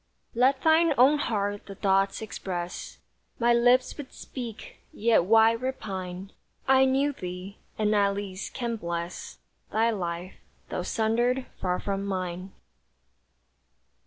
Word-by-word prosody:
Let 260 +3 +3
thine 320 -1 +4
own 275 +5 +6
heart 205 -5 -2
the 195 - -8
thoughts 195 +1 +1
express 180 -4 -5 0.4
My 240 0 +3
lips 245 +2 +4
would 285 -3 -8
speak. 235 -5 -8
Yet 220 -5 +3
why 225 +2 +6
repine? 195 -6 -5 0.4
I 265 0 +6
knew 270 +2 +2
thee, 180 -1 -7 0.2
and, 215 0 +2
at 200 -1 +3
least, 195 -1 -6
can 235 -2 -2
bless 170 -2 -5 0.3
Thy 225 +2 +2
life, 175 -3 -4 0.3
though - - -2
sundered 240 +4 +1
far 180 -1 -1
from 195 -1 -2
mine. 185 -1 -4
215 Hz, 125 wpm, -27 LUFS, 190-245 Hz, 0.4 s, own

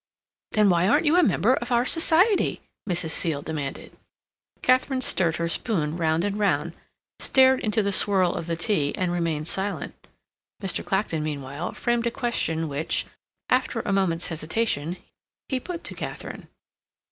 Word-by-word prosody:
"Then 210 -1 +4
why 175 +1 +2
aren't 235 - +3
you 310 +3 +4
a 360 - +6
member 225 - +3
of 245 -1 -3
our 240 0 +3
society?" 340 - +3 0.3
Mrs. 170 -2 -1
Seal 155 -4 -1
demanded. 145 -4 -5 0.7
Katharine 255 +1 +2
stirred 170 -9 +2
her 170 +1 -1
spoon 165 -4 0
round 165 -1 +1
and 205 +1 -2
round, 205 -1 0 0.4
stared 265 0 +4
into 215 0 0
the 200 - 0
swirl 190 -2 +3
of 160 - -5
the 165 - 0
tea, 165 -5 0
and 180 -1 0
remained 165 -3 -1
silent. 195 +3 -2 0.7
Mr. 190 -4 -1
Clacton, 190 -5 -1
meanwhile, 145 +1 -4
framed 240 0 0
a - - +3
question 165 -10 -1
which, 145 +2 -1 0.4
after 255 -2 +1
a 200 - -2
moment's 180 -3 +1
hesitation, 165 0 -2 0.5
he 260 - 0
put 345 +5 -7
to - - -5
Katharine. - - -7
190 Hz, 155 wpm, -25 LUFS, 160-235 Hz, 0.7 s, a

